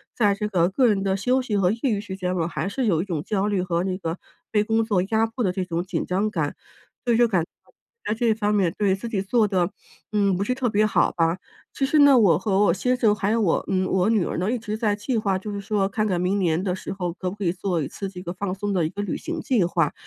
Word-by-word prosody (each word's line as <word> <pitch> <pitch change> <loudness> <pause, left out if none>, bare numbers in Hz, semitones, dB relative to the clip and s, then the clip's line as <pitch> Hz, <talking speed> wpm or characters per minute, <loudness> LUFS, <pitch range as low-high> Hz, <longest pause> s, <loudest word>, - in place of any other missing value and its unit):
在 205 -4 +3
这 210 +1 -2
个 180 -4 +2
个 245 +6 +3
人 205 -3 +2
的 190 -1 +1
休 250 +6 +1
息 240 -5 -3
和 185 -2 +3
业 225 - -4
余 225 -7 +1
时 200 -2 -7
间 180 -1 -2
我 165 -1 0
还 165 +1 -3
是 255 +5 -2
有 170 -7 +2
一 - - -4
种 170 -6 -3
焦 200 +1 -1
虑 200 -3 0
和 175 -1 -1
那 185 -1 -2
个 165 -2 -4 0.3
被 210 -1 +3
工 225 +1 +1
作 205 -5 +1
压 220 +3 +1
迫 230 +2 -4
的 190 - +2
这 185 +1 -2
种 170 -1 -2
紧 185 - -3
张 195 +4 0
感。 - - -2 0.5
所 240 - +3
以 - - +3
就 240 0 +5
感 185 -7 +1 0.6
在 - - +1
这 235 +2 0
一 225 - +4
方 210 -1 0
面 185 -5 +2
对， 200 -2 +2
自 205 +5 -7
己 205 -4 -1
做 215 +2 +2
的， 185 -2 0 0.4
嗯， 200 -2 +2
不 190 - -1
是 250 +5 -1
特 255 -2 0
别 215 0 +2
好 215 - +2
吧。 165 +1 +1 0.4
其 270 - 0
实 300 +3 +2
呢， 285 -2 +7
我 190 -9 +5
和 195 -2 0
我 170 - +4
先 250 +7 0
生 220 -4 +3
还 200 0 -1
有 230 - +2
我 180 -6 +1
嗯， 185 -1 +1
我 190 +2 +1
女 215 -6 +2
儿 - - -3
呢， 185 +5 0
一 250 - 0
直 215 -2 -4
在 215 -2 +1
计 225 +4 -2
划， 195 -3 0
就 210 +3 -6
是 200 0 -4
说 200 -1 0
看 215 +2 -1
看 180 -4 0
明 185 +3 0
年 170 -2 +1
的 185 -2 -1
时 - - -7
候 180 -3 -3
可 180 +1 -4
不 185 - -7
可 205 - -6
以 170 - +2
做 180 -2 -1
一 - - -3
次 195 - -6
这 180 -2 -9
个 175 - -5
放 185 0 -3
松 205 +1 -2
的 175 -4 +1
一 - - -1
个 200 - -5
旅 205 - -3
行 - - -5
计 240 -8 +2
划。 170 -3 +1
200 Hz, 315 characters per minute, -24 LUFS, 180-215 Hz, 0.6 s, 呢